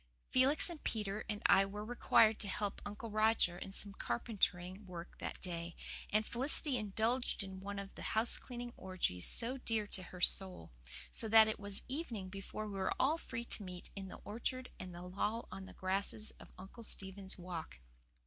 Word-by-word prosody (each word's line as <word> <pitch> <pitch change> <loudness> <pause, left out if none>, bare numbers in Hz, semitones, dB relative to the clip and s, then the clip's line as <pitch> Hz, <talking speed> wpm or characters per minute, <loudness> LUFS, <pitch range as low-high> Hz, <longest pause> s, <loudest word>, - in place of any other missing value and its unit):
Felix 265 +4 +5
and 340 -4 -3
Peter 210 -1 -1
and 210 -1 -3
I 195 - +7
were 205 +2 -5
required 225 -2 +5
to 205 - +1
help 200 +1 -2
Uncle 210 +2 -6
Roger 215 -4 +3
in 195 - -6
some 200 +1 0
carpentering 185 - -1
work 175 -1 -8
that - - -4
day, 170 -2 -4 0.3
and 215 +1 +2
Felicity 270 +4 +3
indulged 225 +2 +1
in 190 -1 -7
one 200 +1 -5
of 200 0 -6
the - - -10 0.2
house 225 +2 +3
cleaning 240 -1 -7
orgies 180 - -1
so 245 +3 +3
dear 225 -4 0
to 200 - -2
her 180 0 -9
soul; 185 - +5 0.4
so 225 - -4
that 220 0 +9
it 220 - -2
was 200 -1 -3
evening 250 - -3
before 195 +2 -5
we 200 -2 -4
were 190 - +1
all 305 +5 +3
free 235 -6 -5
to 225 - -1
meet 180 -1 -7
in 195 -1 -5
the - - -8
orchard 250 +4 -2
and 185 -1 -6
loll 185 +6 -2
on 190 - -6
the - - -11
grasses 195 +3 +1
of - - -13
Uncle 195 +6 -10
Stephen's 190 -2 -4
Walk. 175 - -6
205 Hz, 185 wpm, -36 LUFS, 190-225 Hz, 0.4 s, that